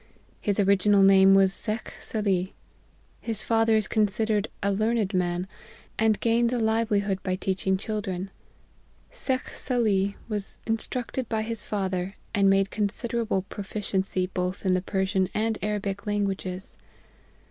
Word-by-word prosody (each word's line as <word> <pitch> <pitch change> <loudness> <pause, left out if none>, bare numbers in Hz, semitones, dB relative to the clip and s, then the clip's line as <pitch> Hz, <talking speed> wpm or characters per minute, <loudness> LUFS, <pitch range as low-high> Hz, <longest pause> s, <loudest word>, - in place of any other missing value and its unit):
His 205 0 0
original 200 0 +4
name 195 0 +7
was 195 -1 +5
Shekh 215 +1 -3
Salih. 195 -5 -1 0.6
His 225 -3 -2
father 225 -1 +3
is 215 -2 +2
considered 215 0 +1 0.2
a 200 - +2
learned 215 0 0
man, 180 0 0 0.5
and 220 -1 +3
gains 235 +1 +2
a 250 - 0
livelihood 220 -4 +1
by 185 -1 -1
teaching 190 0 0
children. 195 -2 -4 0.8
Shekh 260 -1 -2
Salih 205 -6 0
was 210 -3 -5
instructed 235 +2 -2
by 220 -1 0
his 225 -1 -2
father, 190 -2 -2 0.2
and 200 -1 +4
made 195 0 +3
considerable 215 -1 -1
proficiency 195 -2 -2
both 185 +1 -3
in 185 - +3
the 185 - +2
Persian 190 -1 0
and 220 0 0
Arabic 200 -1 -2
languages. 195 -2 -2
200 Hz, 130 wpm, -26 LUFS, 190-220 Hz, 0.8 s, name